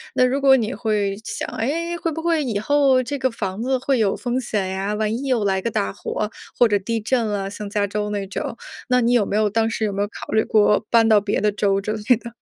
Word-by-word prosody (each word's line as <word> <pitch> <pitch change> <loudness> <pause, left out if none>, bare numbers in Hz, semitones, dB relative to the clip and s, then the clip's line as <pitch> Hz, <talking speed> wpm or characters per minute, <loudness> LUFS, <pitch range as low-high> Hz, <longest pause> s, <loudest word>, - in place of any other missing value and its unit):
那 255 - +4
如 270 +2 0
果 270 -1 +6
你 230 +1 -2
会 210 -3 -1
想， - - -4
诶， 335 +8 -1
会 330 -1 -2
不 325 +2 -4
会 330 -3 +1
以 220 -6 -2
后 275 +1 +3
这 285 +3 -4
个 260 -2 0
房 200 -2 -4
子 260 +1 +1
会 260 -1 0
有 200 -3 +2
风 245 +1 -2
险 210 -5 -2
呀， 195 +2 -2
万 215 0 -1
一 260 +4 -3
又 245 -5 +1
来 190 -1 +1
个 230 - -2
大 100 - -1
火 210 - -3 0.3
或 240 - +6
者 205 - +2
地 225 +3 -2
震 235 +2 0
了 200 -2 -2
像 205 0 -7
加 205 -1 0
州 210 +1 -3
那 200 -2 -3
种。 205 +3 -5 0.3
那 250 0 +4
你 235 +1 +2
有 235 -4 +3
没 205 - -1
有 215 -1 +2
当 225 +2 +1
时 220 0 -1
有 205 - -2
没 200 - -2
有 205 - 0
考 - - -9
虑 220 - +4
过 210 0 +3
搬 230 -1 +4
到 215 -2 +5
别 205 0 -1
的 210 +1 +2
州 200 -1 +1
之 210 +2 -3
类 220 +2 +2
的？ 235 0 -10
220 Hz, 285 characters per minute, -22 LUFS, 205-255 Hz, 0.3 s, 果